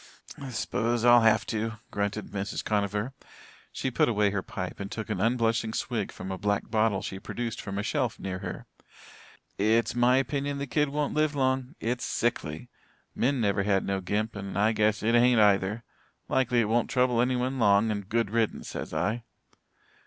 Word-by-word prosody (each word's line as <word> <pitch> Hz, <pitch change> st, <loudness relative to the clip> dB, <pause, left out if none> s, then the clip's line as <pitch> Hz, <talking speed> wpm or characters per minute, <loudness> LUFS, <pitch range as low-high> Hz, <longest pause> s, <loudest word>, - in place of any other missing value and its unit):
"S'pose 120 Hz, -1 st, -1 dB
I'll 120 Hz, 0 st, +8 dB
have 110 Hz, -1 st, +4 dB
to," 110 Hz, 0 st, -2 dB, 0.2 s
grunted 100 Hz, +1 st, -2 dB
Mrs. 100 Hz, 0 st, -4 dB
Conover. 105 Hz, +3 st, -1 dB, 0.6 s
She 130 Hz, -, -3 dB
put 120 Hz, -, +2 dB
away 105 Hz, -3 st, +2 dB
her 100 Hz, -1 st, -1 dB
pipe -, -, -6 dB
and 100 Hz, 0 st, -5 dB
took 110 Hz, -3 st, -5 dB
an 90 Hz, -, -2 dB
unblushing 115 Hz, -1 st, +1 dB
swig 110 Hz, -5 st, -2 dB
from 95 Hz, -, -7 dB
a 95 Hz, -, -4 dB
black 100 Hz, +1 st, -1 dB
bottle 110 Hz, -3 st, +2 dB
she 95 Hz, -, -5 dB
produced 120 Hz, +2 st, -4 dB
from 100 Hz, 0 st, -5 dB
a 100 Hz, -, -1 dB
shelf 125 Hz, -2 st, -1 dB
near 95 Hz, -1 st, -4 dB
her. 90 Hz, -2 st, -6 dB, 0.9 s
"It's 110 Hz, +3 st, +2 dB
my 120 Hz, +2 st, +4 dB
opinion 140 Hz, +1 st, -1 dB
the 140 Hz, -, -3 dB
kid 145 Hz, +3 st, +1 dB
won't 145 Hz, 0 st, -1 dB
live 155 Hz, -1 st, +1 dB
long. 130 Hz, +1 st, 0 dB
It's 120 Hz, +2 st, -2 dB
sickly. 80 Hz, -10 st, -2 dB, 0.5 s
Min 135 Hz, +2 st, +1 dB
never 100 Hz, -3 st, +1 dB
had 100 Hz, -1 st, +1 dB
no 95 Hz, -1 st, -1 dB
gimp 105 Hz, +4 st, -2 dB
and 100 Hz, -1 st, -5 dB
I 105 Hz, +2 st, +3 dB
guess 110 Hz, -1 st, +1 dB
it 115 Hz, +2 st, +2 dB
hain't 120 Hz, 0 st, +5 dB
either. 105 Hz, +1 st, +3 dB, 0.4 s
Likely 125 Hz, -2 st, +2 dB
it 110 Hz, -, 0 dB
won't 120 Hz, +1 st, +1 dB
trouble 125 Hz, -2 st, +2 dB
any 125 Hz, +1 st, +1 dB
one 130 Hz, +2 st, -1 dB
long 105 Hz, 0 st, +4 dB
and 100 Hz, -2 st, -4 dB
good 115 Hz, -3 st, 0 dB
riddance, 115 Hz, -1 st, -1 dB
sez -, -, -6 dB
I." 110 Hz, +9 st, -1 dB
110 Hz, 180 wpm, -28 LUFS, 100-125 Hz, 0.9 s, I'll